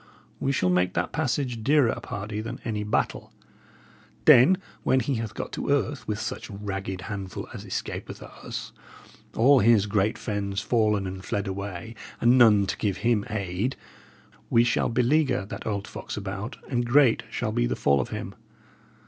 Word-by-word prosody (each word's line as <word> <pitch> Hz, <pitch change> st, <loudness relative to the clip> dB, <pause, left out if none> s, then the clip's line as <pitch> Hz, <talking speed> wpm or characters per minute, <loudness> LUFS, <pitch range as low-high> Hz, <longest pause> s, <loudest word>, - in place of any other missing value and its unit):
We 135 Hz, -, 0 dB
shall 90 Hz, -9 st, +1 dB
make 90 Hz, 0 st, +1 dB
that 85 Hz, +1 st, -1 dB
passage 130 Hz, -5 st, -1 dB
dearer, 140 Hz, -2 st, +4 dB
pardy, 105 Hz, -2 st, -5 dB
than 120 Hz, +4 st, -6 dB
any 105 Hz, -3 st, -2 dB
battle. 105 Hz, -, -1 dB, 0.9 s
Then, 150 Hz, +10 st, +7 dB, 0.2 s
when 130 Hz, -, +3 dB
he 135 Hz, +3 st, -1 dB
hath 110 Hz, -2 st, -5 dB
got -, -, -5 dB
to -, -, -4 dB
earth 145 Hz, 0 st, 0 dB
with 105 Hz, 0 st, -2 dB
such -, -, -5 dB
ragged 95 Hz, -2 st, -5 dB
handful 100 Hz, -2 st, -6 dB
as -, -, -7 dB
escapeth -, -, -5 dB
us -, -, -7 dB, 0.6 s
all 135 Hz, +4 st, +6 dB
his 110 Hz, -2 st, +5 dB
great 105 Hz, +2 st, +1 dB
friends 100 Hz, -2 st, -3 dB
fallen 105 Hz, -4 st, +1 dB
and 95 Hz, 0 st, -6 dB
fled 100 Hz, +2 st, -2 dB
away, 100 Hz, +2 st, -5 dB, 0.3 s
and 120 Hz, +2 st, +5 dB
none 110 Hz, -5 st, +6 dB
to -, -, -3 dB
give 100 Hz, -3 st, -1 dB
him 115 Hz, -4 st, +2 dB
aid 100 Hz, +3 st, -2 dB, 0.7 s
we 115 Hz, -, +5 dB
shall 120 Hz, 0 st, +1 dB
beleaguer 125 Hz, 0 st, +2 dB
that 105 Hz, -, -7 dB
old 100 Hz, -2 st, -2 dB
fox -, -, -7 dB
about, 105 Hz, +4 st, -5 dB
and 120 Hz, -2 st, -1 dB
great 130 Hz, -1 st, +5 dB
shall -, -, -2 dB
be -, -, +1 dB
the -, -, -1 dB
fall 70 Hz, -1 st, +3 dB
of -, -, -5 dB
him. -, -, -5 dB
110 Hz, 165 wpm, -26 LUFS, 100-120 Hz, 0.9 s, Then